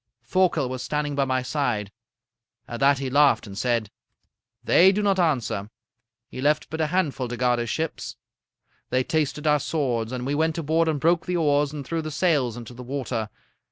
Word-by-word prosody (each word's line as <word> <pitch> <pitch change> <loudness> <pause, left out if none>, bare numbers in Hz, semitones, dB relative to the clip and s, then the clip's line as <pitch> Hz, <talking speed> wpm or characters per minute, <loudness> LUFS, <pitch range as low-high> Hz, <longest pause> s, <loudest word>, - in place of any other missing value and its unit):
"Thorkel 180 -7 +1
was 130 0 -5
standing 150 +1 -2
by 140 -1 +1
my 130 -1 0
side. 125 -7 -1 0.8
At 120 - -6
that 140 0 +4
he 135 -1 -4
laughed 140 -5 +4
and 100 -2 -9
said: 115 -2 -1 0.7
"'They 190 +3 +6
do 210 +2 -1
not 195 -2 +2
answer. 125 - 0 0.6
He 130 - -8
left 150 +2 +1
but 160 0 -2
a 155 - +2
handful 150 -7 -1
to 120 0 -5
guard 125 -1 +2
his 120 -1 -3
ships. 160 +5 -3 0.7
They 130 0 +1
tasted 155 0 -1
our 150 -1 +4
swords. 125 -7 -1
And 125 -1 -4
we 140 - -1
went 160 +2 0
aboard 165 +1 +1
and 155 -2 0
broke 165 +3 +2
the 180 0 0
oars 145 -3 +2
and 145 -2 -6
threw 165 +3 -2
the 155 - -5
sails 145 -7 +1
into 120 0 -9
the 125 - -10
water. 125 -4 -3
145 Hz, 195 wpm, -24 LUFS, 125-160 Hz, 0.8 s, They